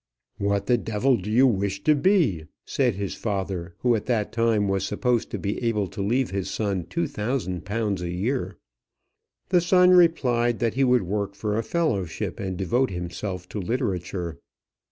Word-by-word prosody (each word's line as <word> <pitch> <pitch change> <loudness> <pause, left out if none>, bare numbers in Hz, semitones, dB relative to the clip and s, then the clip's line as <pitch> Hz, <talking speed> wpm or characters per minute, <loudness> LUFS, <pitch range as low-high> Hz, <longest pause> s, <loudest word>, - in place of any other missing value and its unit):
"What 100 0 0
the 120 -1 +3
devil 115 +5 +1
do 100 -1 -5
you 120 +5 +5
wish 100 -4 0
to 155 - +5
be?" 145 - +2 0.2
said 125 -6 +1
his 100 -1 -3
father, 95 -5 -3
who 125 -1 +3
at 105 - -4
that 115 -5 0
time 115 -3 +2
was 95 -1 0
supposed 120 +4 0
to - - -3
be 100 +4 -3
able 110 -3 +1
to 100 - -6
leave 120 +6 +1
his 95 -1 -2
son 100 -5 -2
£2000 100 +1 -2
a 90 - -3
year. 110 +10 -2 0.9
The 180 -1 +4
son 180 +1 +5
replied 125 -10 +4
that 115 -3 0
he 135 - +1
would 125 -4 +4
work 100 +2 -2
for 105 +1 -2
a 115 - +1
fellowship, 110 - -2
and 95 -2 -3
devote 120 +8 +1
himself 90 +1 -5
to 105 - -4
literature. 90 - -3
105 Hz, 170 wpm, -25 LUFS, 95-125 Hz, 0.9 s, you